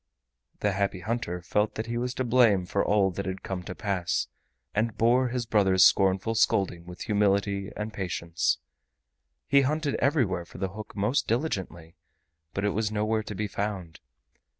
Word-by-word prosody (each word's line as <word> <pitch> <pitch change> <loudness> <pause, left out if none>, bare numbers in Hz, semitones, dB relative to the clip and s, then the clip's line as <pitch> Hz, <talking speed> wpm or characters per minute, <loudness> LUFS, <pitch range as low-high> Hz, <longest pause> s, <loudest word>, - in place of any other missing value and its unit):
The 105 - +2
Happy 100 -1 -1
Hunter 105 -4 -3
felt 105 +3 0
that 110 - -3
he 120 0 -4
was 125 +1 -2
to 130 - -1
blame 115 -6 +4
for 100 +2 0
all 100 -2 +3
that 95 +1 -4
had 95 0 -4
come 95 -2 -4
to 90 - -6
pass, 95 -4 -1 0.5
and 110 +1 0
bore 125 +3 +4
his 125 0 -2
brother's 95 -4 +4
scornful 95 +3 +4
scolding 95 -6 +1
with 90 0 -10
humility 100 -1 +1
and 105 +1 -4
patience. 85 -3 -1 0.9
He 140 -1 +5
hunted 150 +1 0
everywhere 120 - +1
for - - -13
the 95 0 -2
hook 105 +3 -9
most 105 +7 +1
diligently, 95 - -3 0.5
but 95 - -2
it 105 - +2
was 110 +1 -1
nowhere 110 +1 0
to 105 -1 -7
be 105 - -2
found. 100 -5 -4
105 Hz, 170 wpm, -27 LUFS, 95-115 Hz, 0.9 s, He